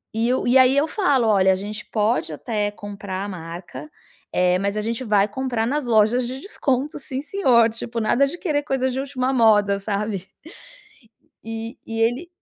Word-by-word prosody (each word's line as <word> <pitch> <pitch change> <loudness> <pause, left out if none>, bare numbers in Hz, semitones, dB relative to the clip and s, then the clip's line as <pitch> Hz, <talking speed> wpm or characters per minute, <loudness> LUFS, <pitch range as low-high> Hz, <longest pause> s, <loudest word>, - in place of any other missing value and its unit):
e 230 +2 +1
eu 255 - 0
e 250 - +5
aí 260 +1 +5
eu 295 +3 +3
falo: 285 - +1
"Olha, 190 -3 +4
a - - +1
gente 205 +3 -6
pode 215 -5 +1
até 210 +6 -2
comprar 200 -1 -6
marca, 165 -4 -8 0.4
eh, 180 0 +2
mas 200 +2 -1
a 210 - 0
gente 230 +3 -3
vai 210 -3 +3
comprar 240 0 -2
nas 290 0 -1
lojas 235 +2 +3
de 260 +2 -5
desconto, 285 - -2
sim 265 -1 -4
senhor, 260 - +3
tipo 230 +1 -4
nada 245 +5 +3
de 340 +6 -5
querer 300 -6 -1
coisa 265 -2 0
de 260 - -3
última 265 -1 -2
moda, 210 -4 +4
sabe". 200 -2 -3 1.2
E 225 +1 -6
e 225 0 -5
ele 245 +9 0
225 Hz, 180 wpm, -22 LUFS, 205-260 Hz, 1.2 s, e